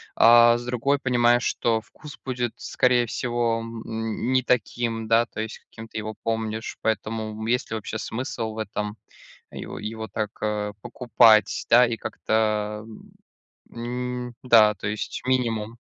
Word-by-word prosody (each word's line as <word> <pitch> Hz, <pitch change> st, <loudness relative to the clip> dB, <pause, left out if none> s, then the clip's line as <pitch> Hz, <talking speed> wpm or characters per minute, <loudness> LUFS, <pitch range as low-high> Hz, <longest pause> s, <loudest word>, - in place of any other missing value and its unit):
а, 120 Hz, 0 st, +7 dB
с 120 Hz, -, -8 dB
другой 125 Hz, +3 st, +1 dB
понимаешь, 120 Hz, -2 st, +3 dB
что 115 Hz, -1 st, 0 dB
вкус 150 Hz, +6 st, -13 dB
будет, 125 Hz, -3 st, -2 dB
скорее 125 Hz, -1 st, +2 dB
всего, 120 Hz, -1 st, -1 dB
м, 115 Hz, +1 st, -4 dB
не 130 Hz, -, +4 dB
таким, 115 Hz, -2 st, -1 dB
да, 115 Hz, +1 st, +4 dB
то 110 Hz, -, -9 dB
есть 110 Hz, 0 st, -6 dB
каким 115 Hz, 0 st, -12 dB
ты 110 Hz, -, -8 dB
его 110 Hz, 0 st, -5 dB
помнишь, 110 Hz, -1 st, -3 dB
поэтому, 110 Hz, 0 st, -2 dB
м, 110 Hz, -, -4 dB
есть 125 Hz, +3 st, 0 dB
ли -, -, -1 dB
вообще 110 Hz, 0 st, -5 dB
смысл 115 Hz, -2 st, -4 dB
в -, -, -11 dB
этом, 105 Hz, 0 st, -4 dB, 0.5 s
его -, -, -7 dB
его 110 Hz, +1 st, -5 dB
так, 105 Hz, -1 st, -3 dB
а, 105 Hz, -1 st, -1 dB
покупать, 115 Hz, -4 st, +3 dB
да? 125 Hz, +1 st, +7 dB
И 115 Hz, -, -2 dB
как-то, 110 Hz, -1 st, -1 dB
м, 110 Hz, -, -13 dB, 1.2 s
м, 120 Hz, -, -16 dB
да, 110 Hz, -4 st, +6 dB
то 100 Hz, -, -5 dB
есть 105 Hz, 0 st, -4 dB
минимум. 115 Hz, -3 st, 0 dB
115 Hz, 155 wpm, -24 LUFS, 110-120 Hz, 1.2 s, а